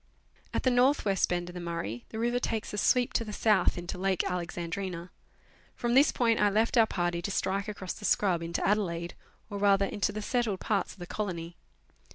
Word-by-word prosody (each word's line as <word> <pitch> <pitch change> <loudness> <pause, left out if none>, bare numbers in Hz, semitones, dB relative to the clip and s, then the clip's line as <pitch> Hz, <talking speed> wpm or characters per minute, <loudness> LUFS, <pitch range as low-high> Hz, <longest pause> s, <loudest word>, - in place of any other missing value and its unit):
At - - -2
the 255 - +3
north 250 +3 +3
west 195 -2 +2
bend 175 0 -1
of - - -16
the 180 - -6
Murray, 165 -10 -4
the 220 - -7
river 240 +2 +1
takes 225 -4 -3
a - - -3
sweep 245 +4 +3
to - - +1
the 215 - -7
south 210 -3 +2
into 175 +1 -5
Lake 190 -1 +1
Alexandrina. 175 0 -4 0.6
From 240 0 -1
this 275 +3 +6
point 230 -3 +2
I 205 - +5
left 220 +5 +1
our 225 -2 +6
party 175 -3 -1
to 180 - -3
strike 200 +1 -1
across 195 -3 -5
the - - -12
scrub 185 -6 +2
into 170 0 -2
Adelaide, 175 -5 0 0.4
or 200 - -4
rather 200 -1 +4
into 205 +1 -1
the 210 +1 -5
settled 230 -5 0
parts 205 -2 -1
of - - -19
the 175 - -7
colony. 175 -4 -4
200 Hz, 205 wpm, -29 LUFS, 175-220 Hz, 0.6 s, this